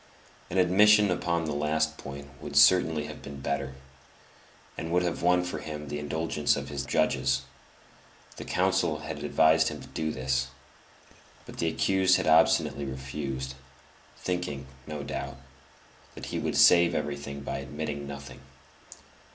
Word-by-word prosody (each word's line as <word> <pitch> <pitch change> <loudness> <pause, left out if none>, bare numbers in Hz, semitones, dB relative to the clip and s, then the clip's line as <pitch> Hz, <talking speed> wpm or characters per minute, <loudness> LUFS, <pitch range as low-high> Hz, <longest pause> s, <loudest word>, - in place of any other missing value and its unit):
An 95 - -3
admission 105 +3 +5
upon 85 -2 0
this 75 - -2
last 80 +2 0
point 70 0 -8
would - - -7
certainly 80 +1 +5
have - - -9
been 70 -1 -9
better, 70 -1 -3 1.0
and 80 - -5
would 90 +1 +2
have 85 -2 -2
won 90 +1 +3
for 90 - -4
him 75 -2 -7
the 75 0 -3
indulgence 75 0 0
of 70 -1 -5
his 70 -1 -3
judges; 70 -4 +1 0.9
the - - -6
counsel - - +1
had - - -6
advised 80 0 +4
him 75 -1 -4
to - - -10
do 80 0 -2
this; 65 0 -1 1.0
but - - -11
the 85 - +1
accused 95 +3 +3
had 95 - -2
obstinately 80 -2 +4
refused, 65 0 -5 0.6
thinking, 90 -7 -3 0.2
no 75 -2 -5
doubt, 70 - -5 0.8
that - - -7
he - - -1
would - - -2
save 85 -1 +6
everything 70 -1 -4
by 70 - -4
admitting 70 +1 -5
nothing. 70 -2 -9
75 Hz, 145 wpm, -28 LUFS, 70-85 Hz, 1.0 s, save